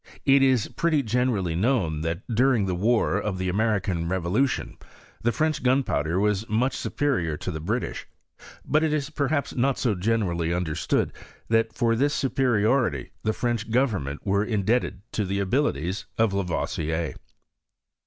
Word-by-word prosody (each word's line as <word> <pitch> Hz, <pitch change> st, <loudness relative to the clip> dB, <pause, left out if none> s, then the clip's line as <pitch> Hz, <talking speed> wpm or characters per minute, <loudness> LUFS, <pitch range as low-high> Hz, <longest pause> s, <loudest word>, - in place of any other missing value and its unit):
It 135 Hz, 0 st, +5 dB
is 130 Hz, -4 st, +3 dB
pretty 160 Hz, -4 st, +1 dB
gene 125 Hz, +3 st, +1 dB
rally 95 Hz, -8 st, -1 dB
known, 90 Hz, -, +1 dB
that 80 Hz, +3 st, -3 dB
during 120 Hz, -2 st, +2 dB
the 95 Hz, -, -1 dB
war 105 Hz, +1 st, +2 dB
of 100 Hz, -2 st, -2 dB
the 95 Hz, 0 st, -1 dB
Americam 95 Hz, -4 st, 0 dB
levolution, 95 Hz, +9 st, -1 dB, 0.4 s
the 120 Hz, -, +2 dB
French 155 Hz, +6 st, 0 dB
gunpowder 125 Hz, -, +1 dB
was 105 Hz, +1 st, 0 dB
much 125 Hz, +5 st, +1 dB
supe -, -, -5 dB
rior 90 Hz, -, 0 dB
to 95 Hz, -, -4 dB
the 80 Hz, -2 st, -5 dB
Eritlsh; 110 Hz, +9 st, -3 dB, 0.6 s
but 155 Hz, +3 st, +2 dB
it 155 Hz, -1 st, +1 dB
is 150 Hz, -1 st, -2 dB
perhaps 145 Hz, -1 st, -1 dB
not 130 Hz, +2 st, +1 dB
so 120 Hz, -5 st, +1 dB
generally 90 Hz, -4 st, 0 dB
understood, 85 Hz, -3 st, 0 dB, 0.4 s
that 115 Hz, 0 st, +2 dB
for 115 Hz, -1 st, +1 dB
this 145 Hz, +5 st, +1 dB
superiority 125 Hz, -, +1 dB
the 110 Hz, -, +1 dB
French 115 Hz, -1 st, -2 dB
go 125 Hz, +4 st, +4 dB
vemment 75 Hz, -, -4 dB
were 100 Hz, +1 st, +1 dB
indebted 105 Hz, -2 st, 0 dB
to 105 Hz, -, -1 dB
the 100 Hz, 0 st, -2 dB
abilities 95 Hz, -, -1 dB
of 110 Hz, -3 st, +2 dB
Lavoisier. 85 Hz, -4 st, -2 dB
110 Hz, 155 wpm, -25 LUFS, 90-130 Hz, 0.6 s, It